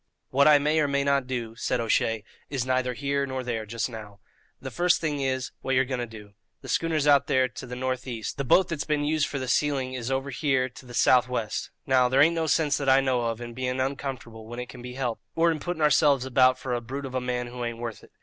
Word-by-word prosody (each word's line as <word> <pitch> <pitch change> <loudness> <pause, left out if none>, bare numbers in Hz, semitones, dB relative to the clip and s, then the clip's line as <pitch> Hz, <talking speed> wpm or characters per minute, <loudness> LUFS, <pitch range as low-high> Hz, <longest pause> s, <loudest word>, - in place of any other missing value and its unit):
"What 140 +2 +4
I 150 -1 +8
may 150 +2 +1
or 150 - +2
may 140 0 +1
not 140 -2 +1
do," 120 -3 -4
said 125 +1 -1
O'Shea, 115 -1 +1 0.3
"is 135 -3 -2
neither 130 -1 0
here 140 +1 -1
nor 130 -1 -4
there 115 -3 -3
just 115 +1 -2
now. 105 -4 -10 0.4
The - - -7
first 180 0 +2
thing 150 -3 -2
is, 130 -2 -1
what 135 - 0
you're 130 +1 +3
going 130 -1 -3
to 120 - -3
do. 105 -2 -12 0.3
The - - -10
schooner's 160 -3 +1
out 140 -1 +5
there 130 0 +3
to 125 - -9
the 125 - -6
north 130 0 -3
east; 115 -4 -5
the - - 0
boat 180 +8 +4
that's 160 -4 -2
been 150 -1 0
used 155 0 +1
for 140 - -4
the 130 -1 -4
sealing 135 0 0
is 125 -1 -4
over 135 +1 -2
here 130 -2 +1
to 125 +1 -14
the 120 - -9
south 125 +1 +4
west; 115 -4 -3 0.2
now, 130 -2 +3
there 130 +2 +2
ain't 165 +4 +6
no 165 -1 -1
sinse, 150 -2 +2
that 140 -2 0
I 135 +1 +6
know 130 -2 +1
of, 115 -1 -2
in 120 0 -7
being 130 +1 -2
uncomfortable 130 -4 -4
when 120 +1 -8
it 125 - -6
can 125 - -10
be 125 0 -8
helped, 125 -4 -3
or 165 +1 +4
in 160 - -3
putting 175 0 -3
ourselves 145 -3 +4
about 130 0 +4
for 130 -1 -4
a 120 - -1
brute 135 +4 -6
of 130 - -7
a 130 - -1
man 125 0 -2
who 120 0 -6
ain't 120 -1 -3
worth 115 -2 -6
it. - - -16
130 Hz, 265 wpm, -26 LUFS, 120-140 Hz, 0.4 s, I